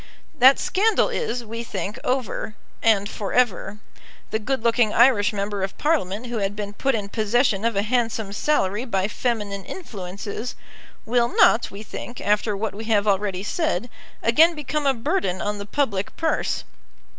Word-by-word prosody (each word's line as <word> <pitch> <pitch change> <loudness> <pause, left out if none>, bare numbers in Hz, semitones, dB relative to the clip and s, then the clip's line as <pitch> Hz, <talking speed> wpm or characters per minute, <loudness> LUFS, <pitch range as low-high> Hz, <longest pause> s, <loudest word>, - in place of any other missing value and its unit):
That 260 +2 +7
scandal 425 +2 +2
is, 250 - -2
we 230 +2 -5
think, 210 -2 -5
over, 250 -4 -2 0.3
and 210 -3 +3
for 205 -1 -5
ever. 220 -4 +1 0.5
The 220 - 0
good 255 +2 -2
looking 230 -2 +3
Irish 235 -4 +5
member 200 -1 -3
of 190 0 -3
Parliament 250 - 0
who 240 -2 -3
had 200 0 -1
been 205 -1 -5
put 270 +4 0
in 205 -2 -3
possession 215 0 +1
of 230 -2 +1
a 200 - +2
handsome 225 -3 -1
salary 210 -4 +1
by 195 -5 0
feminine 210 -4 -2
influences, 200 - -6 0.5
will 235 +1 +2
not, 235 -1 +4
we 200 +2 -9
think, 240 +2 -8
after 210 0 +1
what 210 -1 -2
we 215 +3 -7
have 215 -2 +2
already 195 -1 0
said, 305 -1 -1 0.3
again 320 +9 +5
become 300 0 -2
a 270 - +3
burden 240 - -1
on 205 0 -2
the 200 - -7
public 205 -6 -1
purse. 325 -1 0
220 Hz, 165 wpm, -23 LUFS, 200-250 Hz, 0.5 s, That